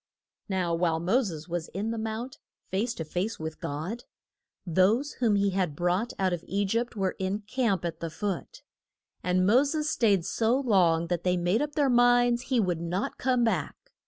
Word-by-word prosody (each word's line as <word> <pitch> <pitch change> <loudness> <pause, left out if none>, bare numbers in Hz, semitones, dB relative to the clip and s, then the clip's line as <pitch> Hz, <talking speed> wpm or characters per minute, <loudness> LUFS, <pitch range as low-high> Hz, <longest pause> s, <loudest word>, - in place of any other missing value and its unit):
] - - -66
Now 185 -3 0
while 165 -1 +1
Mo 190 +10 +2
ses 165 - -5
was 175 -1 -3
in 210 +4 -2
the 230 - -3
mount, 225 +3 -5 0.3
face 225 +5 -1
to 160 - -5
face 185 +8 -3
with 160 0 -6
God, 165 +12 -5 0.6
those 200 - +2
whom 225 -4 +3
he 200 0 +2
had 185 -6 -1
brought 180 +8 0
out 190 -2 +1
of 175 -1 -4
E 200 +1 0
gypt 230 +4 -1
were 190 -3 -1
in 190 +2 -1
camp 210 -4 -1
at 170 - -4
the 165 - -4
foot. 190 +3 -5 0.6
And 180 +1 +1
Mo 240 +7 +5
ses 305 +1 -1
staid 200 -7 +2
so 230 +6 +1
long 180 -10 +3
that 175 -1 -1
they 180 0 +2
made 175 +6 +1
up 295 0 -2
their 290 -3 +3
minds 245 -1 +4
he 255 -3 +2
would 180 -5 0
not 175 +4 -3
come 250 -2 +2
back. 190 -10 0
195 Hz, 195 wpm, -28 LUFS, 175-235 Hz, 0.6 s, Mo